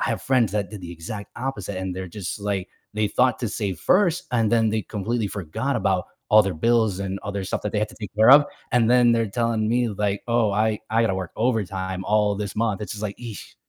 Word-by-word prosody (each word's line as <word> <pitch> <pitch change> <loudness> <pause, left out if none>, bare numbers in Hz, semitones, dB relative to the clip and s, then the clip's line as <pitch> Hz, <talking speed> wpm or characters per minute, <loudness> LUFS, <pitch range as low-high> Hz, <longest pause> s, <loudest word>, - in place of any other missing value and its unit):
I - - 0
have - - -2
friends 125 -7 +2
that 105 -2 -1
did 105 -3 -8
the 85 -1 -7
exact 100 +5 -7
opposite, 105 -7 -4
and 95 -1 -4
they're 95 0 -4
just, 95 +2 -5
like 100 -2 -2 0.3
they 105 -1 +1
thought 125 +1 +2
to 120 - -1
save 100 -5 -3
first, 180 -3 +3
and 115 -2 +1
then 115 -1 +4
they 110 0 -1
completely 110 +2 -2
forgot 95 -6 -3
about - - +1 0.3
all 110 0 +8
their 95 -2 -2
bills 110 +1 +2
and 95 0 -3
other 100 -1 -3
stuff 95 - -3
that 105 - -3
they 105 - 0
had 105 - 0
to 120 - -15
take 105 -1 -7
care 110 +4 +6
of, 145 +1 +9 0.3
and 120 -2 +3
then 120 -1 +5
they're 115 -1 +2
tellin' 115 0 0
me, 120 +1 +2
like, 100 -1 -2
"Oh, 115 -2 +2
I 110 +1 +1
I 115 - +3
gotta 110 -4 +1
work 95 -2 -5
overtime 95 -5 -1
all 105 0 +2
this 100 -2 -4
month," 110 -3 0
it's 105 - -5
just 105 0 -7
like, 100 -1 -3
"Eesh." 115 -4 -9
105 Hz, 240 wpm, -24 LUFS, 100-115 Hz, 0.3 s, of